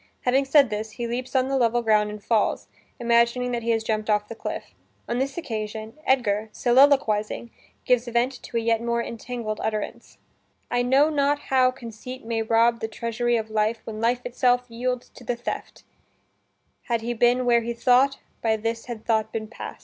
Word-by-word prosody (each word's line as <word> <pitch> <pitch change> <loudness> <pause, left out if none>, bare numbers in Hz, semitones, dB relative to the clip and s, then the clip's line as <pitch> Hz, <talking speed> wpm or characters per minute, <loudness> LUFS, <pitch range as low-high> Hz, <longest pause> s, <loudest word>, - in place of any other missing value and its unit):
Having 265 +2 +2
said 275 -2 +5
this, 215 +1 -4
he 235 - -4
leaps 250 +3 -4
on 260 0 +3
the 270 - -1
level 240 0 +2
ground 210 -1 +3
and 210 -1 -8
falls, 220 -1 +1 0.3
imagining 235 +1 +2
that 240 -1 -1
he 230 - -3
has 225 -1 +2
jumped 215 -1 -2
off 210 0 +2
the - - -5
cliff. 225 - -6 0.3
On 240 - -1
this 270 +3 -2
occasion, 220 -6 -5
Edgar, 220 -5 +2
soliloquizing, 240 -4 +3 0.3
gives 250 -1 +2
vent 240 +2 0
to 235 - -5
a - - +1
yet 230 0 +1
more 235 0 0
entangled 230 -2 -5
utterance: 215 -1 -4 0.5
"I 245 - +2
know 270 +5 +4
not 290 -1 +2
how 260 -3 +2
conceit 250 0 -9
may 225 -1 -1
rob 230 +1 +3
The 220 - -2
treasury 235 +2 -1
of 220 -1 -4
life 215 +1 0
when 215 -1 -6
life 245 +2 +1
itself 245 0 +2
Yields 250 +1 -3
to - - -15
the 245 0 -1
theft; 240 - -6 1.0
had 235 -3 0
he 240 +1 -2
been 245 +2 +3
where 235 -1 +4
he 235 +1 -3
thought, 255 +3 +4 0.2
By 220 -1 +2
this 225 +1 -3
had 235 -3 -7
thought 220 -2 +1
been 220 -1 -4
past." - - -8
235 Hz, 190 wpm, -25 LUFS, 220-250 Hz, 1.0 s, said